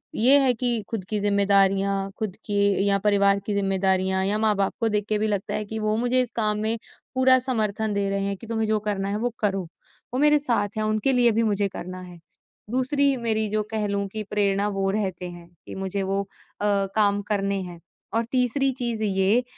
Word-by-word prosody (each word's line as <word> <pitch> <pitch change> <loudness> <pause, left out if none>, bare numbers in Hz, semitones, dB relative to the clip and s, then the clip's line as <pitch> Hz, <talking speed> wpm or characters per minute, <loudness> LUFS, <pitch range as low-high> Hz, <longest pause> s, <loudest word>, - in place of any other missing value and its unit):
ये 260 +6 +7
है 265 -2 +3
कि 240 -1 0
खुद 220 -4 -4
की 215 - 0
ज़िम्मेदारियाँ, 195 -1 +2
खुद 210 -4 -4
की 200 -1 +1
या 200 0 +4
परिवार 200 -1 +4
की 210 - -2
जिम्मेदारियाँ 190 -1 +1
या 205 +2 +1
माँ 215 -1 +2
बाप 195 -1 0
को 230 - +2
देख 210 -1 0
के 215 - +2
भी 215 - +1
लगता 200 -2 -2
है 215 - -3
कि 220 +2 -5
वो 215 0 0
मुझे 245 +2 +3
इस 250 - -3
काम 215 -2 +1
में 220 +2 0 0.4
पूरा 260 0 +6
समर्थन 220 -4 -1
दे 200 0 -1
रहे 200 0 -1
हैं 200 0 -2
कि, 225 - -12
तुम्हें 225 -1 -1
जो 215 0 +1
करना 200 -2 -2
है 205 - -1
वो 240 +3 -1
करो। 195 -3 0 0.5
वो 255 - -1
मेरे 300 +1 +5
साथ 220 -7 -1
हैं, 215 - 0
उनके 215 +4 +1
लिए 245 -2 +4
भी 225 +1 +1
मुझे 205 -2 +1
करना 185 -1 -8
है, 180 -1 -12 0.5
दूसरी 275 +2 +2
मेरी 220 -2 0
जो 215 +1 0
कह 215 -1 -1
लूँ 200 0 -2
की 215 -1 -3
प्रेरणा 200 -1 +1
वो 195 0 0
रहते 190 -4 -3
हैं 175 -1 -12 0.2
कि - - -9
मुझे 195 +1 -3
वो 195 +1 -1
अ, 200 +1 -10 0.3
काम 205 -1 +2
करने 200 -1 0
हैं। 175 -2 -9 0.3
और 230 +1 +1
तीसरी 260 +2 +1
चीज़ 235 -3 -3
ये 200 +4 +2
210 Hz, 215 wpm, -24 LUFS, 195-225 Hz, 0.5 s, ये